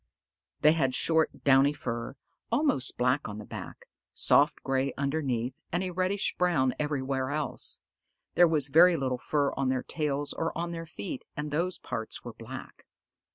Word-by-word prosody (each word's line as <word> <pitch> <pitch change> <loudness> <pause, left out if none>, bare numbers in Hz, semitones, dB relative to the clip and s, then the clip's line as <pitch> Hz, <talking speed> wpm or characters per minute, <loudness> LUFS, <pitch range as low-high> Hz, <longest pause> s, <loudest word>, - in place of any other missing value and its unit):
They 150 - +7
had 135 -5 +1
short, 160 -1 +1
downy 140 +1 +5
fur, 120 -2 -4 0.4
almost 245 - +2
black 125 0 +1
on 105 - -6
the 105 - -8
back, - - -8 0.3
soft - - +3
gray 135 0 0
underneath, 140 -4 -1 0.2
and 175 +2 0
a 185 - -3
reddish 185 +3 0
brown 155 -8 +2
everywhere 135 -3 -1
else. 150 0 -3 0.5
There 175 - +6
was 150 -4 +1
very 170 +4 +6
little 130 -2 -1
fur 145 +1 0
on 135 -1 0
their 130 -1 0
tails 145 -2 -2
or 165 - -2
on 170 +1 -2
their 165 -1 -6
feet, 115 -3 -6
and 150 0 -3
those 175 +5 -1
parts 115 -3 -5
were - - -6
black. - - -10
145 Hz, 160 wpm, -29 LUFS, 130-165 Hz, 0.5 s, They